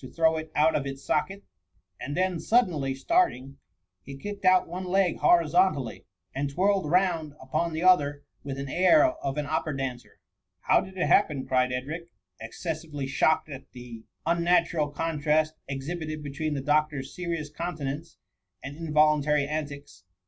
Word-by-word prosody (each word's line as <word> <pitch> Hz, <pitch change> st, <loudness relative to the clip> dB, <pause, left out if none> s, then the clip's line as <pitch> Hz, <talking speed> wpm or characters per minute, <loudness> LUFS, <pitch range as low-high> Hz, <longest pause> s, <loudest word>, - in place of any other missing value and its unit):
throw 160 Hz, -1 st, +3 dB
it 160 Hz, 0 st, -5 dB
oiit 155 Hz, +2 st, +4 dB
of 140 Hz, -2 st, -1 dB
its 135 Hz, 0 st, -7 dB
socket; 195 Hz, +6 st, -1 dB, 0.6 s
and 145 Hz, +5 st, -5 dB
then, 185 Hz, -2 st, 0 dB
suddenly 165 Hz, -, +1 dB
starting, 135 Hz, -, 0 dB, 0.4 s
he 135 Hz, +7 st, -10 dB
kicked 205 Hz, +6 st, -7 dB
out 185 Hz, 0 st, +5 dB
one 180 Hz, +3 st, -5 dB
leg 185 Hz, -1 st, +1 dB
horizontally, 155 Hz, -, +2 dB, 0.3 s
and 140 Hz, +1 st, -2 dB
twirled 190 Hz, +2 st, +1 dB
round 170 Hz, -4 st, +1 dB
upon 150 Hz, +6 st, -2 dB
the 160 Hz, +2 st, -3 dB
other 145 Hz, -6 st, +3 dB, 0.2 s
with 135 Hz, -1 st, -5 dB
an 140 Hz, 0 st, -5 dB
air 185 Hz, -, +5 dB
of 320 Hz, -, -2 dB
an 150 Hz, -, -1 dB
opera 155 Hz, -1 st, -2 dB
dancer. 130 Hz, -2 st, -5 dB, 0.2 s
" -, -, -57 dB
How -, -, +5 dB
did 190 Hz, 0 st, -10 dB
it 180 Hz, -, +1 dB
happen 150 Hz, -9 st, +2 dB
?" -, -, -17 dB
cried 125 Hz, -1 st, +2 dB
Edric, 150 Hz, +7 st, -4 dB, 0.3 s
exces 155 Hz, +8 st, -4 dB
sively 145 Hz, -4 st, -6 dB
shocked 145 Hz, +4 st, +2 dB
at 135 Hz, -3 st, -10 dB
the 120 Hz, -2 st, -10 dB, 0.2 s
unnatural 170 Hz, -2 st, +2 dB
contrast 155 Hz, 0 st, 0 dB, 0.2 s
exhi 140 Hz, +6 st, -4 dB
bited 155 Hz, -1 st, -5 dB
between 145 Hz, +2 st, -3 dB
the 140 Hz, -, -2 dB
doctor's 150 Hz, -2 st, 0 dB
serious 165 Hz, -4 st, -4 dB
countenance, 155 Hz, -2 st, -5 dB, 0.5 s
and 140 Hz, +2 st, -7 dB
involuntary 150 Hz, -2 st, +2 dB
antics. 145 Hz, -4 st, -6 dB
155 Hz, 160 wpm, -27 LUFS, 140-170 Hz, 0.6 s, out